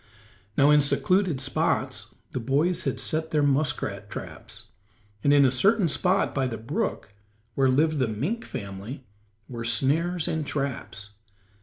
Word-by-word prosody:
Now 140 +2 +6
in 150 0 +6
secluded 180 +1 +1
spots - - -1 0.2
the - - -3
boys 155 +9 0
had - - -1
set 160 0 -1
their 150 -2 +1
muskrat 135 -8 0
traps, - - -9 0.5
and 140 - +4
in 145 -1 +6
a 130 - +4
certain 195 - +3
spot 185 +5 +1
by 135 -2 0
the 115 -3 -4
brook 110 -2 -3 0.4
where 135 -1 +3
lived 155 +3 +2
the 130 - +2
mink 150 - -2
family 100 +6 -7 0.4
were 120 -2 -6
snares 150 +9 0
and 160 -1 -1
traps. 135 -8 -4
140 Hz, 145 wpm, -26 LUFS, 125-160 Hz, 0.5 s, Now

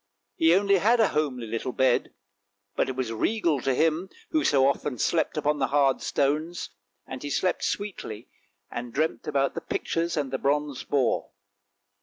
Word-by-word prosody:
He 165 +6 +5
only 200 0 +4
had 230 +6 +3
a 220 - +4
homely 140 -6 -1
little 115 +3 -3
bed, 130 -2 +2 0.6
but - - +1
it 130 - -3
was 125 -3 -2
regal 165 - +1
to 135 0 +1
him, 165 +5 +1 0.2
who 310 -1 +2
so 135 -2 +4
often 140 -1 -1
slept 160 +7 0
upon 150 0 +1
the 135 - +2
hard 135 0 +2
stones, 155 +5 -1 0.3
and 130 -1 -7
he 145 - -5
slept 180 +5 0
sweetly 155 - -4 0.4
and 120 0 -5
dreamt 155 +4 -1
about 140 -2 +1
the - - -4
pictures 165 0 -2
and 140 -3 -1
the 135 - -2
bronze 145 -1 0
boar. 135 -4 0
145 Hz, 170 wpm, -26 LUFS, 130-165 Hz, 0.6 s, He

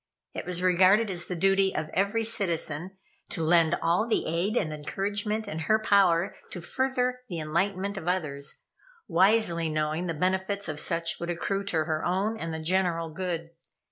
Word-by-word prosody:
It - - -6
was 180 0 0
regarded 190 +4 +4
as 175 -2 +1
the 180 - -3
duty 195 +2 +2
of 155 - -2
every 200 +4 +1
citizen 185 -4 -1 0.3
to 165 - -3
lend 165 0 +4
all 175 +7 +2
the 230 - +1
aid 175 +8 0
and 155 -8 0
encouragement 205 +8 -2
in 160 -5 -4
her 215 +7 +2
power 195 -5 +3
to 180 - -6
further 250 +6 -1
the 175 - -4
enlightenment 190 +5 -1
of 175 - -6
others, 150 -6 -3 0.4
wisely 175 -2 +3
knowing 155 +3 -1
the 165 - -2
benefits 190 +4 -1
of 155 -2 -3
such 165 0 0
would 170 - -4
accrue 195 +3 -2
to 160 -5 0
her 155 -1 -2
own 195 +5 0
and 165 -7 -5
the 160 - -3
general 165 0 0
good. 165 -1 -4
180 Hz, 170 wpm, -27 LUFS, 165-200 Hz, 0.4 s, regarded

